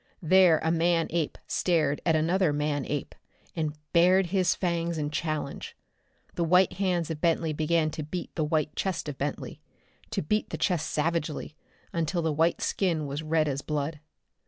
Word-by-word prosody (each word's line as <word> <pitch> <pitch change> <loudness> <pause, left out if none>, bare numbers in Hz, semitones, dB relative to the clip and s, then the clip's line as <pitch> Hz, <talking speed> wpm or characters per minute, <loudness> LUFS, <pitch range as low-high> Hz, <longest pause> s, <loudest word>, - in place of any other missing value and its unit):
There 180 -1 +6
a 160 - +2
man 165 0 +2
ape 165 -3 -1
stared 155 -5 +1
at 165 - +4
another 170 +2 +2
man 145 -1 -1
ape, 145 -2 -3 0.4
and 155 -3 -2 0.2
bared 180 +2 +5
his 185 -2 +3
fangs 170 -2 -1
in 150 -1 -2
challenge. 155 -3 -4 0.6
The 170 - -1
white 180 +2 +4
hands 180 -4 0
of 150 - -5
Bentley 165 -2 +1
began 155 +1 +1
to 155 - -5
beat 170 +4 -6
the 160 - -1
white 155 -1 0
chest 190 -5 -2
of 145 -2 -6
Bentley 145 0 -4 0.5
to - - -2
beat 210 +8 0
the - - -4
chest 175 -5 0
savagely, 155 -1 -2 0.4
until 170 +1 -1
the 160 -1 +1
white 165 +3 +1
skin 170 -6 0
was 140 +2 -4
red 155 0 +1
as 140 -1 -2
blood.... 150 +1 -3
160 Hz, 170 wpm, -28 LUFS, 150-175 Hz, 0.6 s, There